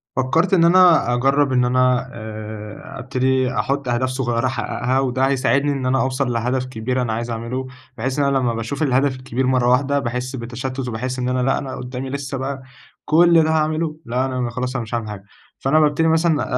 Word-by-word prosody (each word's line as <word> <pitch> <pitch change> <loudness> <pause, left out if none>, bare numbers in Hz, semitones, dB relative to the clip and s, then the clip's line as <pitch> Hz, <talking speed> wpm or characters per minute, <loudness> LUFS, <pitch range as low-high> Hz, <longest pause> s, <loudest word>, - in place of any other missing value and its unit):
فكَّرت 160 +9 +1
إن 170 -3 +5
أنا، 175 -7 +5
أجرَّب 135 +3 +2
إن 125 -1 +3
أنا، 125 0 +2
آآ 110 +6 -8
ابتدي 130 0 0
أحُط 140 -1 -1
أهداف 120 +2 0
صغيرة 130 -2 -1
أحقَّقها، 130 0 -1
وده 130 0 +1
هيساعدني 140 +1 +1
إن 135 -2 -3
أنا 130 +1 +2
أوصَل 130 -1 0
لهدف 125 +2 -1
كبير 125 +1 -2
أنا 115 -3 -1
عايز 115 +2 -3
أعمله، 115 +3 -4 0.3
بحيث 130 +4 -2
إن 145 - +3
أنا 140 -1 +2
لما 125 -3 0
باشوف 115 +6 -3
الهدف 135 -1 +2
الكبير 130 0 -2
مرة 130 -2 +2
واحدة، 140 +3 +2
باحس 125 +1 -3
بتشتُّت 125 +2 -5
وباحس 125 +3 -3
إن 125 0 -1
أنا، 130 0 0
لأ، 135 - +2
أنا 135 -2 -5
قُدامي 125 +1 -6
لسّه 140 0 -4
بقى، 135 0 -4 0.4
كل 165 +1 +5
ده 160 - 0
هاعمله! 155 0 0
لأ، 125 +2 0
أنا 125 -2 -2
خلاص، 125 +2 -4
أنا 125 - -1
مش 110 +1 -10
هاعمل 115 -2 -3
حاجة، 100 -2 -7 0.4
فأنا 135 +4 +3
بابتدي 150 +1 +2
مثلًا، 160 -1 +2
130 Hz, 195 wpm, -20 LUFS, 125-140 Hz, 0.4 s, إن